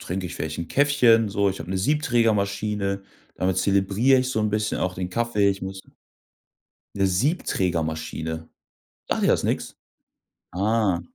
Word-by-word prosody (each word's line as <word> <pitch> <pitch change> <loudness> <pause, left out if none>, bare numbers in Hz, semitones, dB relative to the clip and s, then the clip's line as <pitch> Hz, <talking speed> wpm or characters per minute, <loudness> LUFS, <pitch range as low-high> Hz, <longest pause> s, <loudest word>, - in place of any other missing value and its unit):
trinke 90 +1 -4
ich 90 - -7
vielleicht 80 0 -4
'n 85 - -3
Käffchen, 125 - +4
so. 100 0 +1
Ich 95 - -7
habe 80 +2 -7
'ne 95 - -1
Siebträgermaschine, 105 -6 0 0.3
damit 95 0 0
zelebriere 100 +7 +3
ich 130 0 0
so 110 - -1
'n 105 0 0
bisschen 105 0 -1
auch 90 0 -1
den 90 0 -4
Kaffee. 105 0 +1
Ich 95 -1 -5
musste 95 0 -7 1.1
'Ne 100 -1 +2
Siebträgermaschine. 80 - -1 0.6
Sagt - - 0
dir - - +3
das - - +2
nix? - - -2 0.8
Ah. 100 -1 +1
100 Hz, 150 wpm, -24 LUFS, 90-115 Hz, 1.1 s, Käffchen